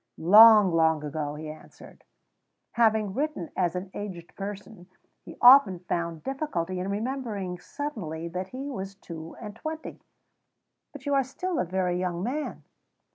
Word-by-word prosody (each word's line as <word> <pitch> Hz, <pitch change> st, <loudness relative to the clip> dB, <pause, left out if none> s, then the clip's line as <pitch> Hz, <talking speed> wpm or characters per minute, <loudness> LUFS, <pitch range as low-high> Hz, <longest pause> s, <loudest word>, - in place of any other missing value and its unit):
"Long, 210 Hz, +2 st, +8 dB
long 160 Hz, -2 st, +3 dB
ago," 150 Hz, 0 st, -4 dB
he 155 Hz, +1 st, -7 dB
answered. 155 Hz, 0 st, -13 dB, 0.7 s
(Having 220 Hz, -4 st, +2 dB
written 285 Hz, -, -3 dB
as 180 Hz, -2 st, 0 dB
an 185 Hz, +1 st, -5 dB
aged 180 Hz, -5 st, -7 dB
person, 200 Hz, -2 st, -8 dB, 0.3 s
he -, -, -12 dB
often 245 Hz, -7 st, +8 dB
found 170 Hz, -2 st, -4 dB
difficulty 185 Hz, -, -3 dB
in 185 Hz, +2 st, -3 dB
remembering 210 Hz, -5 st, -3 dB
suddenly 180 Hz, -, -5 dB
that 180 Hz, +2 st, -4 dB
he 270 Hz, +7 st, -6 dB
was 195 Hz, -5 st, -6 dB
two 165 Hz, -4 st, -9 dB
and 210 Hz, -2 st, -8 dB
twenty.) 315 Hz, +6 st, -7 dB, 0.9 s
"But -, -, -12 dB
you 285 Hz, -, 0 dB
are 275 Hz, -1 st, +3 dB
still 340 Hz, +7 st, -4 dB
a -, -, +1 dB
very 180 Hz, 0 st, -1 dB
young 180 Hz, -1 st, -2 dB
man." 285 Hz, +7 st, -4 dB
195 Hz, 145 wpm, -27 LUFS, 170-245 Hz, 0.9 s, Long